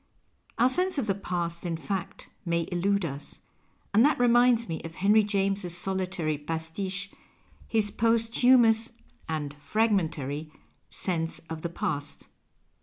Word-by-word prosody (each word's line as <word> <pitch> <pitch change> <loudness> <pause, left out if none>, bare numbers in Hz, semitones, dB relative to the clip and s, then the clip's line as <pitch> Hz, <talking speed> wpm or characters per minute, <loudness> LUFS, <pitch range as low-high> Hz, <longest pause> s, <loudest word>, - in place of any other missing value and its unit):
Our 240 - +5
sense 365 +6 +2
of 270 - 0
the 200 - +1
past, 175 -3 -3
in 170 -2 -2
fact, 190 +2 -5 0.2
may 170 -2 0
illude 195 +2 +1
us. 140 -2 -5 0.5
And 220 +3 +6
that 295 +3 +4
reminds 240 -1 +4
me 165 -2 -4
of 165 0 -8
Henry 205 +3 +4
James's 195 -3 0
solitary 185 -5 -2
pasfiche, 165 +5 -4 0.6
his 215 -2 +1
posthumous 230 0 +3 0.4
(and 150 -3 -3
fragmentary) 155 - -1 0.2
" - - -43
Sense 165 -3 -1
of 160 -1 -5
the 170 - -3
Past." 145 -3 -3
190 Hz, 130 wpm, -28 LUFS, 165-225 Hz, 0.6 s, And